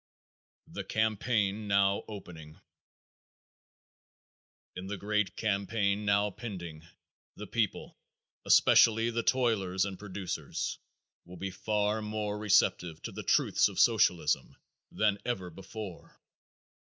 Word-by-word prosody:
The - - -7
Campaign 110 -1 0
Now 100 0 +3
Opening. 85 -7 -10 2.2
In 90 +1 -6
the 100 0 -4
great 105 -1 -1
campaign 100 -1 0
now 100 0 +2
pending 85 -8 -8 0.5
the 105 - -7
people, 110 0 -2 0.4
especially 115 +1 +5
the 115 0 -1
toilers 105 -8 +1
and 95 -2 -6
producers, 95 -6 -4 0.4
will 90 +1 -12
be 95 +2 -4
far 105 +3 -1
more 105 -1 -3
receptive 90 -5 +2
to - - -5
the - - -6
truths - - +3
of - - -6
Socialism - - +3 0.4
than 105 -2 +1
ever 95 -8 -3
before. 95 +1 -9
100 Hz, 105 wpm, -30 LUFS, 95-110 Hz, 2.2 s, especially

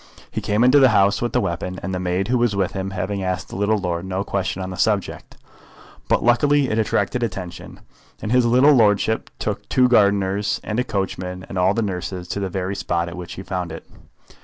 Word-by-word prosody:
He - - -3
came 105 +3 +1
into 130 +3 +6
the 130 -2 +6
house 100 -2 +3
with 120 - -1
the 125 - +2
weapon, 90 -2 -3
the 90 0 -3
maid 90 +2 -1
who 125 0 +1
was 120 -4 +1
with 95 -1 0
him 95 0 -4
having 95 +1 -3
asked 95 0 -3
the - - -8
little 105 +2 +1
lord 90 -3 -2
no 95 +1 -3
question 95 -2 -2
on 95 - -5
the - - -5
subject. 100 +1 -1 0.7
But - - +2
luckily 140 +3 +3
it 110 - +1
attracted 105 +1 0
attention, 95 -6 -6 0.4
and 105 - -4
his 125 -1 +4
little 130 +5 +5
lordship 110 -2 +2
took - - -4
two 125 -1 +4
gardeners 100 -2 +2
and 105 +2 -2
a - - +2
coachman 95 -3 -4
and - - -8
all 95 +2 +2
the 115 - 0
nurses 90 -2 -4
to - - -3
the 95 -1 -2
very 95 +2 -3
spot 85 -3 -1
at 85 - -8
which 90 -1 -7
he 95 - -8
found 90 -3 -4
it. 80 - -8
100 Hz, 215 wpm, -21 LUFS, 90-110 Hz, 0.7 s, into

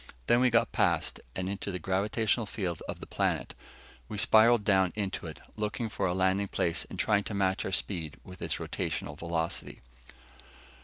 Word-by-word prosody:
Then 120 - +4
we 125 0 +5
got 115 -1 +3
past, - - +1 0.2
and 95 0 -2
into 100 +1 -3
the 90 - -2
gravitational 105 +5 0
field 90 -6 -3
of - - -5
the - - -7
planet. - - -1 0.6
We 105 - -4
spiralled 110 +1 +6
down 95 -3 +4
around 100 -3 -1
it, - - -8
looking 105 +2 -2
for 105 - -1
a 90 - 0
landing 95 +2 +2
place 85 -2 0
and - - -7
trying 105 -1 +3
to 105 - -4
match 95 -1 +1
our - - -2
speed 85 -6 -2
with 90 -1 -12
its - - -1
rotational 75 - -3
velocity. 85 +1 -3
100 Hz, 175 wpm, -30 LUFS, 90-105 Hz, 0.6 s, spiralled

